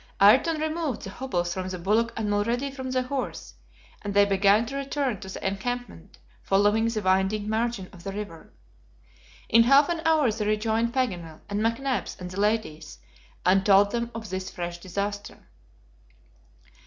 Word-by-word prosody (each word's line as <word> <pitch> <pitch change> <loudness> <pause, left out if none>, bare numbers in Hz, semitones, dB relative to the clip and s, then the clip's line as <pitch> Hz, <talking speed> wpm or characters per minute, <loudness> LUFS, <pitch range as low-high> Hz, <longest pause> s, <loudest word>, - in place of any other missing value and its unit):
Ayrton 270 +11 +5
removed 315 -4 -2
the 195 - -6
hobbles 175 -9 -2
from 185 0 -4
the 185 - -4
bullock 215 +6 +1
and 220 - -1
Mulrady 230 +7 0
from 260 -1 -6
the 255 0 0
horse, 260 0 -5 0.5
and 200 -1 -5
they 205 0 +6
began 200 +3 +3
to 275 +4 -6
return 275 -4 -2
to 190 -3 -9
the 190 - -4
encampment, 200 -2 -5 0.2
following 205 +3 +2
the 220 -2 -2
winding 190 +3 +1
margin 220 -3 -1
of 175 -2 -13
the 195 - -4
river. 195 -5 -8 1.0
In 230 0 +6
half 275 +4 +6
an 340 -1 -1
hour 315 -7 +3
they 215 0 -3
rejoined 220 +2 +1
Paganel, 180 -11 -2
and 205 0 -2
McNabbs, 250 +4 -1
and 180 -1 -7
the 185 - -5
ladies, 205 - -1 0.5
and 190 +1 +4
told 200 0 +5
them 235 +1 -2
of 220 -4 -7
this 190 0 -3
fresh 175 0 -5
disaster. 200 +3 -5
210 Hz, 165 wpm, -26 LUFS, 195-245 Hz, 1.0 s, they